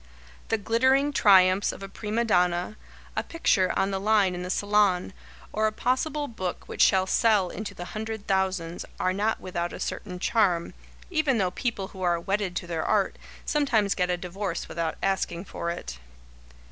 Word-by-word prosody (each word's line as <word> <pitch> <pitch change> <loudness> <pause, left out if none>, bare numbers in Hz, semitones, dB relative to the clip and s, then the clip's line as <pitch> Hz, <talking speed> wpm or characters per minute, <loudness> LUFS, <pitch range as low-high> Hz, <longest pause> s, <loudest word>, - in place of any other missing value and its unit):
The 225 - +2
glittering 260 +7 +2
triumphs 190 -3 +5
of - - -10
a - - -5
prima 215 +4 -2
donna, 180 -1 +1 0.4
a - - +1
picture 195 - +1
on 195 - +1
the 195 - -1
line 205 -2 +3
in 180 - -5
the 180 - -5
Salon, 200 -2 +2 0.4
or 215 +1 +2
a - - 0
possible 290 +6 -1
book 185 -7 -5
which - - -3
shall 190 -1 +5
sell 205 -2 +3
into 215 +3 -6
the 175 - -6
hundred 220 +1 -5
thousands, 190 -3 -1 0.2
are 185 - +1
not 210 +3 0
without 175 -2 -3
a - - -7
certain 180 -3 -4
charm, 180 -4 +1 0.4
even 305 -7 +2
though 185 -4 +1
people 205 -3 -3
who 190 - -11
are 175 -2 +2
"wedded 195 +1 -2
to - - -3
their 165 -2 -3
art" - - +1 0.3
sometimes 235 -9 +2
get 180 -1 0
a 180 - +1
divorce 180 +1 -4
without 165 -1 -3
asking 190 -2 -1
for 170 - -4
it. 65 - -6
195 Hz, 175 wpm, -26 LUFS, 180-220 Hz, 0.4 s, triumphs